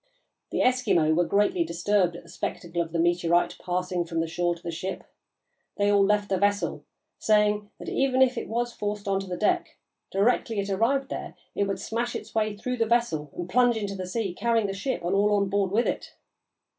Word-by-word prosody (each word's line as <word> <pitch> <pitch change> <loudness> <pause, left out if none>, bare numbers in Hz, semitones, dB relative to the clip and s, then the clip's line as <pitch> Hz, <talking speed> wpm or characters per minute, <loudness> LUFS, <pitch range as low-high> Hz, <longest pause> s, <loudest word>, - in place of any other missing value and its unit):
The - - -1
Eskimo 210 -12 +3
were 175 +1 +3
greatly 200 -3 +2
disturbed 175 +2 +1
at - - -9
the 170 - -17
spectacle 170 0 -3
of 165 -1 -4
the 170 - -2
meteorite 175 0 +2
passing 180 0 -1
from 165 -1 -3
the 165 - +1
shore 175 +1 0
to 170 - -17
the 170 - -3
ship. 185 +4 -5 0.7
They 205 0 +3
all 200 -1 +5
left 205 +1 +2
the 190 -1 +1
vessel, 205 0 0 0.3
saying 210 -1 +2
that - - -10
even 265 -1 +3
if 255 -1 +2
it - - -4
was 240 +1 -2
forced 205 -1 -4
on 195 -1 +1
to 195 - -6
the 180 -1 -4
deck, 215 - 0 0.3
directly 220 +1 +1
it 200 0 -2
arrived 265 +7 +1
there - - -6 0.2
it 200 - +1
would 195 0 -2
smash 235 +2 -2
its 220 - -7
way 215 -2 0
through 250 +4 -3
the 225 -1 +1
vessel 220 -11 +1
and 175 - -4
plunge 240 +4 +3
into 205 -2 -3
the 185 -2 -5
sea, 195 -1 -2
carrying 230 +2 +1
the 195 - -2
ship 200 +2 -3
and 175 - 0
all 205 +1 +3
on 200 -1 +1
board 200 -1 +1
with 220 +5 +2
it. - - -3
200 Hz, 215 wpm, -26 LUFS, 175-220 Hz, 0.7 s, all